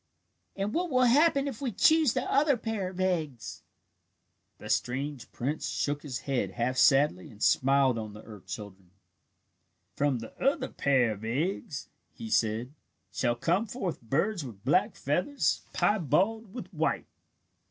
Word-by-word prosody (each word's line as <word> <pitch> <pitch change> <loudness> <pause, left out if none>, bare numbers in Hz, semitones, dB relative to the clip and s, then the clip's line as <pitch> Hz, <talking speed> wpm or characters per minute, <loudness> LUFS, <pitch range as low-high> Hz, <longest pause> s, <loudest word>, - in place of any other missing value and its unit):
"And 200 +2 -2
what 350 +1 0
will 255 -3 +3
happen 280 +3 +4
if 265 -3 -6
we 260 -4 -1
choose 315 - +4
the 255 - -1
other 280 -1 +3
pair 220 -5 -3
of 185 0 -10
eggs?" 150 - -2 1.0
The - - -10
strange 135 +1 -2
prince 145 +6 -3
shook 145 0 -1
his 130 -5 -5
head 135 -3 -1
half 125 +2 -1
sadly 135 -9 +4
and 105 - -15
smiled 135 0 +3
on 110 -2 -6
the 105 - -11
earth 105 -4 -12
children. 95 -3 -8 1.1
"From 145 -2 +1
the 115 -1 -9
other 270 -1 +1
pair 130 -5 +2
of 105 0 -7
eggs," 150 - -2 0.3
he 225 -1 -7
said, 115 - +1 0.4
"shall 120 - 0
come 175 - 0
forth 200 -6 -4
birds 160 - 0
with 105 -7 -10
black - - +2
feathers, 180 - 0
piebald 205 - +1
with 245 - -8
white. - - 0
145 Hz, 150 wpm, -29 LUFS, -, 1.1 s, happen